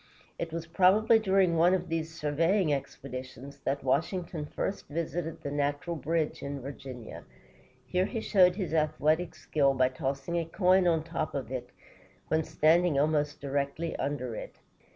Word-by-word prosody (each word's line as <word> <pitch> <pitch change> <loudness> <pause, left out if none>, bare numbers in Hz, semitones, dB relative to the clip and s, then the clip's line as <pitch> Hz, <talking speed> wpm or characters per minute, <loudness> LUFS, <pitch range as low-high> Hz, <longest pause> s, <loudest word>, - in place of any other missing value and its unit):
It 170 -1 -3
was 165 0 -4
probably 195 +6 +4
during 190 -4 +3
one 175 +3 +5
of 180 -1 -3
these 165 0 -2
surveying 165 +3 +2
expeditions 135 0 -6
that 140 +1 -1
Washington 160 +3 -1
first 195 - -4
visited 165 +1 -4
the 140 - -3
Natural 145 +4 -1
Bridge 160 0 -1
in 140 0 -4
Virginia. 130 -3 -8 0.6
Here 185 +1 +1
he 230 - -3
showed 180 -4 +4
his 185 -5 -3
athletic 155 +2 +1
skill 140 -3 +1
by 130 -1 +3
tossing 135 +5 -3
a 165 - -2
coin 185 +2 +3
on 165 -2 +2
top 165 -2 -3
of 130 -4 -4
it 130 -2 -4 0.6
when 160 0 +2
standing 160 +1 +3
almost 150 0 +1
directly 140 +4 -2
under 135 -4 -2
it. - - -7
155 Hz, 155 wpm, -29 LUFS, 140-175 Hz, 0.6 s, one